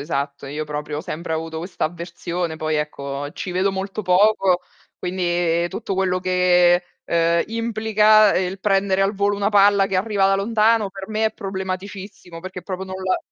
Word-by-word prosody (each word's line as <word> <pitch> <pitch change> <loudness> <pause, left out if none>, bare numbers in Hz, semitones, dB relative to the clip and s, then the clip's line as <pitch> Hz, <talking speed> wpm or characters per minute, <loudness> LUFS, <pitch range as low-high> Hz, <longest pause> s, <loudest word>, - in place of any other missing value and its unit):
esatto. 140 -2 -3
Io, 150 +2 -4
proprio, 150 0 -4
ho - - -3
sempre 170 -2 -5
avuto 160 0 -4
questa 175 +3 -4
avversione. 170 0 -4
Poi, 155 -1 -1
ecco, 145 -1 -4
ci 185 - -5
vedo 185 +2 +1
molto 195 +2 -4
poco, 185 -1 +3 0.4
quindi 175 -2 0
tutto 200 +1 -5
quello 185 -1 0
che, 180 -1 +4 0.2
uhm, 170 0 +2
implica, 215 -2 +3
ehm, 185 - +1
il 190 - -8
prendere 195 -1 +2
al 195 +2 +1
volo 200 +1 +1
una 200 +1 0
palla 200 -1 +5
che 195 -1 -1
arriva 195 0 +1
da 195 - +3
lontano, 215 +1 +2
per 195 0 -9
me 220 0 +1
è - - -2
problematicissimo, 190 -2 -6
perché 185 0 -8
proprio 190 -1 -5
non 190 - -7
la 185 - +1
185 Hz, 175 wpm, -21 LUFS, 170-200 Hz, 0.4 s, palla